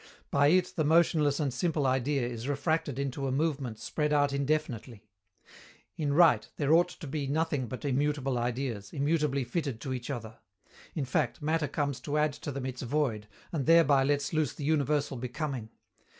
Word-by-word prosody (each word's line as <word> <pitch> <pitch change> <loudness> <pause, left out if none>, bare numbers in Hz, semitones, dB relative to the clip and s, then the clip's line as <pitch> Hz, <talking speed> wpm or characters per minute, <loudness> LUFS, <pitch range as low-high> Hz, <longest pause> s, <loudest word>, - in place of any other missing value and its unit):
By 145 0 +4
it 180 +3 +3
the 155 - +1
motionless 155 -2 +3
and 140 -4 0
simple 155 0 0
Idea 130 0 +1
is 120 0 -5
refracted 145 -1 -1
into 140 0 -2
a - - -1
movement 135 -5 -1
spread 150 +5 -2
out 145 -1 +3
indefinitely. 140 -6 -2 0.9
In 145 -3 -1
right, 145 -9 +5
there 145 +1 +2
ought 175 +2 +5
to 175 - -10
be 140 0 -3
nothing 145 -3 0
but 130 +4 -6
immutable 140 -2 0
Ideas, 120 -4 -3
immutably 145 -1 +1
fitted 135 -2 -3
to 130 - -3
each 125 +1 -5
other. 115 -5 -6 0.6
In 145 - -1
fact, 145 +2 -1
matter 155 0 +1
comes 140 -3 -2
to 150 0 -2
add 150 -1 +2
to 145 - -6
them 135 -1 -4
its 130 -1 -5
void, 125 -5 -1 0.2
and 150 -5 -2
thereby 150 -5 +6
lets 145 +2 0
loose 155 -4 +1
the - - -7
universal 145 -2 +1
becoming. 125 -1 -4
140 Hz, 175 wpm, -30 LUFS, 130-150 Hz, 0.9 s, thereby